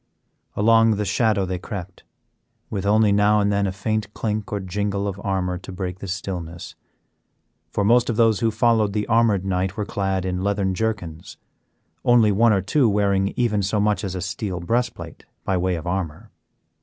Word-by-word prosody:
Along 115 +1 +4
the 105 0 -2
shadow 105 -1 +1
they 90 -1 -3
crept, 95 -2 -8 0.7
with 100 -1 -2
only 105 0 +4
now 105 +1 +4
and 100 0 +2
then 100 0 +1
a - - -1
faint 105 +2 -2
clink 105 -2 -3
or 105 - -1
jingle 100 +1 -2
of 100 0 -5
armor 90 -2 -1
to 95 - -10
break 90 0 -5
the 100 - -7
stillness, 90 -2 -5 1.0
for 100 - -1
most 120 +3 +4
of 120 - 0
those 115 -2 +3
who 115 -1 +2
followed 110 -3 +2
the 105 -1 -1
armed 115 -5 +2
knight 95 0 -1
were 105 - -1
clad 95 -2 -2
in 90 0 -2
leathern 100 -1 0
jerkins; 90 -6 -4 0.7
only 120 -3 +5
one 115 +3 +4
or 95 -3 +2
two 120 +5 +2
wearing 100 -1 +1
even 115 -5 +1
so 100 +2 0
much 105 +1 +1
as 95 -2 -3
a 90 - -3
steel 95 +1 -4
breast 120 +8 0
plate 85 -2 -10 0.2
by 95 - +1
way 90 0 0
of 80 - -6
armor. 85 -4 -4
100 Hz, 185 wpm, -22 LUFS, 95-110 Hz, 1.0 s, only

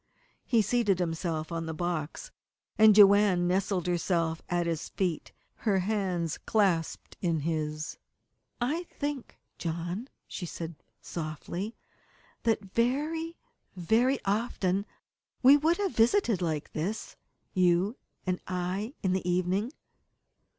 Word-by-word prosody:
He 230 -3 +4
seated 210 -3 +2
himself 165 -2 -2
on 165 -1 -3
the 160 - -4
box, 175 - -3 0.4
and 215 -1 +7
Joanne 200 -3 +6
nestled 185 0 +1
herself 170 -2 0
at 175 -1 +1
his 165 -2 -3
knees, 180 -5 0 0.3
her 205 -4 +1
hands 185 -5 -1
clasped 190 -7 0
in 165 -4 +1
his. 155 -1 -2 0.6
"I 300 +9 -1
think, 290 -5 -5 0.2
John," 175 +7 -3 0.2
she 175 - -5
said 165 0 -5 0.3
softly, 170 +6 -5 0.7
"that 220 -3 +1
very, 310 +8 0 0.4
very 230 +9 +3
often 200 -2 0 0.6
we 270 +3 +9
would 315 +4 +3
have 400 -3 0
visited 230 - +3
like 155 -4 -2
this 190 +8 -3 0.4
you 185 +3 +3 0.3
and 185 -1 0
I 185 - -2
in 185 -2 +2
the 185 -1 -1
evening." 185 +6 +1
185 Hz, 115 wpm, -29 LUFS, 170-225 Hz, 0.7 s, we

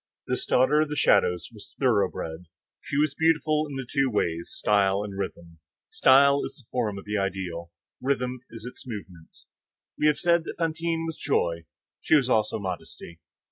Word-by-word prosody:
This - - -2
daughter 145 +4 +4
of 155 - 0
the 150 - -3
shadows 90 - +2
was 105 - -11
thoroughbred. 100 - 0 0.3
She 140 - -4
was 150 -1 +2
beautiful 155 0 +2
in 140 - -6
the 135 -1 -4
two 135 0 +1
ways—style 100 +1 +1
and 100 -2 -7
rhythm. 85 -4 -6 0.3
Style 140 - +5
is - - -6
the 125 - -17
form 110 -5 -1
of 100 - -9
the 105 0 -1
ideal; 90 -3 -4 0.3
rhythm 125 -1 -1
is 115 0 -9
its 125 +1 -9
movement. 95 -8 -9 0.6
We 150 - +4
have 150 - +3
said 170 -1 +2
that - - -6
Fantine 165 0 -1
was 165 -2 -5
joy; 85 -1 0 0.4
she - - +3
was 135 -4 +3
also 110 -3 +2
modesty. 90 -3 -7
125 Hz, 170 wpm, -26 LUFS, 95-150 Hz, 0.6 s, Style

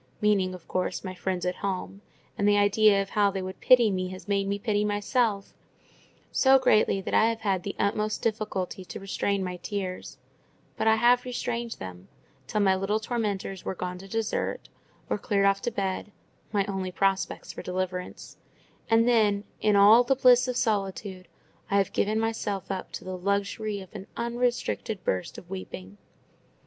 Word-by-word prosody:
meaning, 195 -3 +2
of 180 - -14
course, 185 - -2
my 185 -1 -5
friends 185 -1 -3
at 180 - -1
home; 195 0 -4 0.3
and 205 - +1
the 205 0 +5
idea 205 0 +4
of 195 - -14
how 205 -1 +3
they 195 -1 -3
would 185 0 -6
pity 240 -4 +6
me 185 -1 -1
has 185 +2 -9
made 200 -1 +1
me 200 0 0
pity 210 -1 0
myself—so 210 +4 0
greatly 215 -6 +3
that 190 - -5
I 220 - +5
have 225 -1 -3
had 195 -4 0
the 200 +2 -5
utmost 210 +1 -1
difficulty 210 -3 -2
to - - -8
restrain 195 0 -1
my 180 -1 -4
tears: 185 -1 -5 0.6
but - - -1
I 220 - +6
have 240 +2 +4
restrained 240 -2 -3
them, 95 0 -9 0.4
till 210 - 0
my 195 -1 +4
little 195 +3 0
tormentors 205 -5 -3
were - - -3
gone 180 0 -5
to 195 - -11
dessert, 225 +2 -2 0.4
or - - -1
cleared 200 -1 +1
off 195 0 +3
to 240 - -2
bed 195 0 -3 0.4
(my 200 -2 +1
only 190 -2 -3
prospects 195 +1 -1
of - - -7
deliverance), 180 0 -4 0.5
and 225 +1 +4
then, 210 -4 +3 0.2
in 210 -1 +3
all 210 +4 +8
the 270 +2 +2
bliss 250 -1 +5
of 250 -1 -2
solitude, 195 -5 -2 0.4
I 200 - +2
have 195 -2 +1
given 215 +2 +1
myself 220 -3 -2
up 190 -1 -5
to - - -6
the 185 0 -5
luxury 200 +2 -1
of 190 - -13
an 200 -1 -8
unrestricted 235 -3 -1
burst 90 -1 -2
of 175 - -11
weeping. 100 - -8
200 Hz, 175 wpm, -27 LUFS, 190-220 Hz, 0.6 s, all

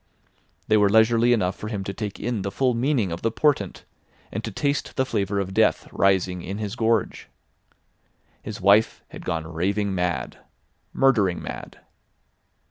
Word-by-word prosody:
They 110 - +4
were 105 -1 +4
leisurely 115 +3 +4
enough 95 -6 +1
for 105 - -7
him 105 -3 -3
to 100 - -5
take 105 0 -5
in 115 -2 -2
the 100 - -2
full 125 +5 +1
meaning 120 - 0
of 85 - -5
the 115 - +1
portent, 115 -5 0 0.5
and - - -4
to - - -3
taste 140 -1 -2
the 130 - +1
flavour 100 -5 -1
of 95 -1 -3
death - - +2
rising 95 -2 +2
in 95 +3 -5
his 105 -2 -4
gorge. 115 -1 0 1.1
His 110 - -7
wife 100 +3 +3
had - - -10
gone 80 -1 -2
raving 100 +4 0
mad—murdering 95 +3 -1
mad. - - -8
105 Hz, 155 wpm, -24 LUFS, 95-115 Hz, 1.1 s, They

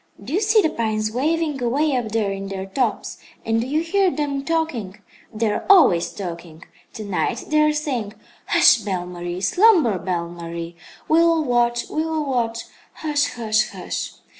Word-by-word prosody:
"Do 255 - -7
you 385 - +1
see 430 0 +4
the 315 - +1
pines 215 -1 -1
waving, 300 +3 -1
away 275 +4 +1
up 240 -3 -2
there 215 -2 0
in 195 0 -5
their 190 -1 -5
tops, 220 +3 -2 0.3
and 225 0 +1
do 240 - -4
you 300 +4 0
hear 380 +3 +2
them 285 -4 -2
talking? 285 - -2 0.3
They 220 -1 -1
are - - -3
always 320 - +5
talking. 170 -4 -8 0.3
To 215 - -7
night 200 +4 -2
they 305 0 +3
are 305 0 +4
saying: 255 -9 -3 0.3
'Hush, - - +6
Belle 195 -5 -3
Marie; 175 0 -6
slumber, 325 - +4
Belle 170 -1 -2
Marie; 170 0 -7 0.3
we 315 - +4
will 335 -1 +3
watch, 240 -2 +1
we 310 - -2
will 320 -2 -2
watch, 235 -4 -1 0.3
hush, 290 -2 -1
hush, 215 -2 +1
hush!' - - -5
235 Hz, 175 wpm, -21 LUFS, 195-305 Hz, 0.3 s, Hush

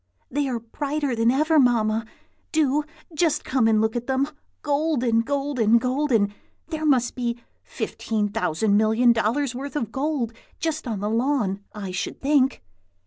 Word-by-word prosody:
"They 285 0 0
are 240 -2 -2
brighter 280 +3 -2
than 230 0 +3
ever, 305 +5 +3
Mamma! 225 -3 +2 0.4
Do 300 -1 +2 0.3
just 305 -1 +1
come 255 -4 +2
and 220 -1 +4
look 220 +1 +1
at 240 0 -3
them! 265 +2 +1 0.3
golden, 280 -6 +1
golden, 255 -3 +2
golden! 250 -5 +1 0.4
There 315 -2 -2
must 250 -4 +3
be 240 -1 -2 0.2
fifteen 215 -2 -3
thousand 200 +2 +1
million 220 +3 +4
dollars' 240 +4 0
worth 275 +4 -6
of 230 -7 -2
gold 270 -4 -1 0.3
just 315 -3 -2
on 215 -4 -3
the 210 - -1
lawn, 225 -5 0
I 200 -3 -5
should 180 - -4
think." 270 - +2
250 Hz, 150 wpm, -24 LUFS, 225-285 Hz, 0.4 s, and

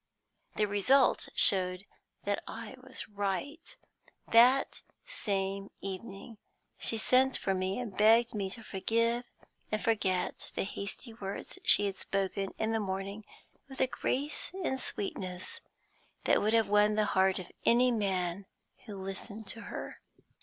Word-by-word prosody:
The 215 - +2
result 225 +7 +3
showed 185 -1 +3 0.4
that 205 0 -1
I - - -7
was 260 0 -6
right. 205 - -4 0.5
That 245 +4 +5 0.2
same 195 - -2
evening 195 +3 -7 0.4
she 225 - +2
sent 255 +4 +3
for 195 - -1
me 185 +1 -1
and 225 -6 -5
begged 225 +3 +5
me 200 -3 -2
to 225 +4 -8
forgive 230 +4 0 0.5
and 215 - 0
forget 195 -5 -1
the - - 0
hasty 200 +4 -4
words 200 -3 -6
she 205 - +7
had 200 - -1
spoken 195 0 -2
in 220 0 0
the 225 - +1
morning 200 +1 -4 0.4
with 265 - -10
a 260 - +4
grace 275 +3 -2
and 265 -5 0
sweetness 185 -5 -2 0.6
that - - +3
would 215 +2 +1
have 225 -1 +4
won 210 +1 +4
the 215 0 +2
heart 190 0 +3
of 180 -1 -7
any 245 +2 +5
man 190 -4 -1 0.4
who 210 - -6
listened 200 +3 -6
to 230 - -5
her. - - -7
205 Hz, 140 wpm, -31 LUFS, 195-230 Hz, 0.6 s, she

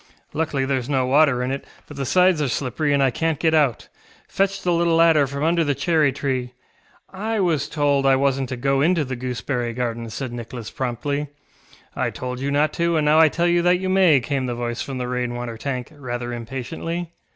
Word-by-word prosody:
Luckily 145 -3 -1
thereŌĆÖs 130 -1 -2
no 130 -3 +1
water 135 -1 +3
in 125 - -2
it, 140 - -3 0.2
but 145 - -10
the 135 -2 -3
sides 180 +1 +4
are 145 - +1
slippery 135 +4 -1
and 140 -1 +3
I 135 - +3
canŌĆÖt 160 +5 -1
get 160 +2 +1
out. 145 -7 +2 0.4
Fetch 195 0 0
the 175 - +2
little 170 0 +2
ladder 165 -4 +5
from 140 +2 -4
under 165 +1 +2
the 145 -2 0
cherry 155 -4 +2
treeŌĆöŌĆØ 130 -2 -2 0.6
ŌĆ£I 215 +1 -1
was 155 -4 0
told 145 -3 +1
I 135 - +5
wasnŌĆÖt 135 -1 +1
to 130 - -5
go 135 +2 +1
into 165 0 +2
the 130 0 -4
gooseberry 125 -1 -3
garden, 120 -2 -3
ŌĆØ - - -9
said 130 +2 -5
Nicholas 120 -1 -7
promptly. 140 +4 -3 0.7
ŌĆ£I - - -1
told 125 0 -5
you 140 +2 -2
not 145 +2 +1
to, 170 -1 +1
and 155 - +1
now 150 +1 +5
I 160 -1 +7
tell 170 +3 -1
you 175 0 +3
that 180 +1 +3
you 185 +1 -3
may, 185 -6 +5
ŌĆØ - - -11
came 135 -1 -1
the 120 - -3
voice 120 0 -3
from 135 -2 -5
the 125 -1 -3
rain 125 -1 -2
water 120 -1 -5
tank, 125 +1 -4
rather 120 -3 -5
impatiently. 150 +8 -5
140 Hz, 220 wpm, -22 LUFS, 125-160 Hz, 0.7 s, I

